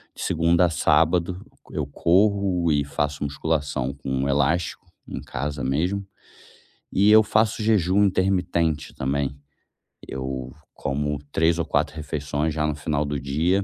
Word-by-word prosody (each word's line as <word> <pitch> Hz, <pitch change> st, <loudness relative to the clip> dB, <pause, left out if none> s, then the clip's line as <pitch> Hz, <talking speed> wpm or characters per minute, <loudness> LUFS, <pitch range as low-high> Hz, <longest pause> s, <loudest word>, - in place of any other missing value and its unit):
de -, -, -9 dB
segunda 85 Hz, +2 st, +3 dB
a -, -, +2 dB
sábado, 85 Hz, +3 st, +2 dB, 0.3 s
eu 75 Hz, -3 st, -3 dB
corro 95 Hz, 0 st, +2 dB
e 70 Hz, -1 st, +2 dB
faço 75 Hz, 0 st, -2 dB
musculação 70 Hz, -2 st, -1 dB
com 65 Hz, 0 st, -2 dB
elástico 80 Hz, +5 st, 0 dB, 0.2 s
em -, -, -5 dB
casa 70 Hz, +1 st, -4 dB
mesmo. 90 Hz, +10 st, 0 dB, 0.9 s
E 100 Hz, +2 st, +4 dB
eu 110 Hz, 0 st, +8 dB
faço 110 Hz, +1 st, +1 dB
jejum 100 Hz, -2 st, +3 dB
intermitente 90 Hz, -5 st, 0 dB
também, 70 Hz, +1 st, -1 dB, 0.7 s
eu 65 Hz, -1 st, -5 dB, 0.2 s
como 75 Hz, +1 st, -2 dB
3 80 Hz, +1 st, +2 dB
ou -, -, 0 dB
4 -, -, 0 dB
refeições 75 Hz, 0 st, -2 dB
já 75 Hz, 0 st, 0 dB
no 75 Hz, -, -1 dB
final 75 Hz, 0 st, -1 dB
do 70 Hz, 0 st, -2 dB
dia. 80 Hz, +9 st, +1 dB
80 Hz, 135 wpm, -24 LUFS, 70-90 Hz, 0.9 s, eu